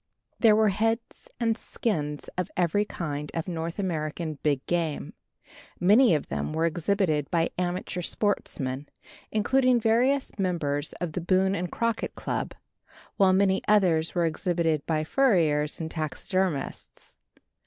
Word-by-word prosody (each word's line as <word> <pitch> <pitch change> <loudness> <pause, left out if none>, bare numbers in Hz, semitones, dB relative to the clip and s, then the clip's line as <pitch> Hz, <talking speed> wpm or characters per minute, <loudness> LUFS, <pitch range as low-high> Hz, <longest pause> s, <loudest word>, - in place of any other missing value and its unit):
There 220 -2 +6
were 215 0 +4
heads 225 - -1
and 230 -1 +2
skins 150 -12 -2
of 180 +1 -2
every 180 +4 +2
kind 150 -6 -4
of 165 +1 -2
North 165 -1 -4
American 155 -4 -3
big 145 -3 0
game. 165 -4 -2 0.7
Many 210 +2 +5
of 150 - -3
them - - -3
were 160 +1 +1
exhibited 170 -3 0
by 170 -2 +1
amateur 180 0 -2
sportsmen, 145 -9 -2 0.4
including 255 +3 +3
various 240 +3 +1
members 155 -6 -1
of 175 -2 -4
the 180 - -2
Boone 190 +3 +2
and 180 -2 -3
Crockett 230 -1 -1
Club, - - -3 0.6
while 190 -1 +5
many 190 0 +3
others 180 -7 +3
were 175 -1 +2
exhibited 165 -2 0
by 155 -1 +1
furriers 160 - +2
and 160 -1 -4
taxidermists. 160 +2 -3
175 Hz, 130 wpm, -27 LUFS, 155-205 Hz, 0.7 s, There